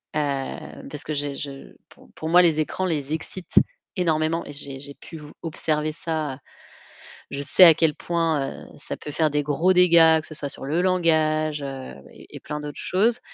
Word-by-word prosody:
heu, 140 -3 -4
parce 150 - -5
que 155 - -4
j'ai 145 -1 -2
je 140 -1 -8
pou - - -19
pour 160 - -5
moi 175 +2 +7
les 160 -2 +3
écrans 185 +4 -3
les 150 -4 -2
excitent 175 +3 -6 0.4
énormément 165 -1 0
et - - -7
j'ai 140 -2 -6
j'ai 140 0 -8
pu 165 - -11
vous 150 -1 -12
observer 155 -1 -1
ça. 155 -5 -3 0.9
Je 140 - -4
sais 140 +7 +7
à 165 - +10
quel 160 -2 +2
point, 165 -5 -2
heu, - - -14
ça - - -4
peut 150 - -8
faire 155 -1 +1
des 145 0 0
gros 160 +6 +2
dégâts, 165 -3 +6
que - - -9
ce 155 - -9
soit 145 -1 -4
sur - - -9
le 165 +5 0
langage, 155 -4 +1
heu 135 - -7 0.2
et - - -13
plein 150 0 -5
d'autres 150 -1 -7
choses. 225 +6 +1
155 Hz, 195 wpm, -23 LUFS, 145-165 Hz, 0.9 s, à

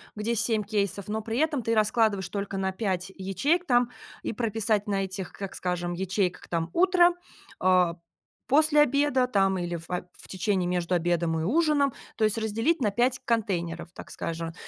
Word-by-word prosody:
где 220 +2 -1
7 220 0 +1
кейсов, 200 -2 -2
но 215 +1 -2
при 225 +2 -2
этом 300 -5 +1
ты 230 - 0
раскладываешь 215 -3 +2
только 200 -1 -4
на 190 0 0
5 190 -2 -2
ячеек, 240 - 0
там, 245 -4 +3 0.3
и - - -3
прописать 220 -2 0
на 195 -1 0
этих, 190 -1 -6
как 195 -1 -7
скажем, 175 -1 -2
ячейках, 185 +1 -1
там: 165 -1 -1
"Утро", 355 -1 +5 0.4
а, 180 -2 +3 0.5
"После 300 +1 +5
обеда",- 280 -2 +3
там, 195 -5 +2
или 175 0 -3
фа 175 +2 -5
в - - -15
течении, 190 -1 0
между 180 0 0
обедом 170 -1 +1
и - - -2
ужином, 285 - +2 0.2
то 225 - -1
есть 215 +1 +1
разделить 225 +9 0
на 215 - +3
5 245 +4 +1
контейнеров, 175 -8 -1
так - - -10
скажем, 165 0 -4
205 Hz, 170 wpm, -27 LUFS, 180-240 Hz, 0.5 s, Утро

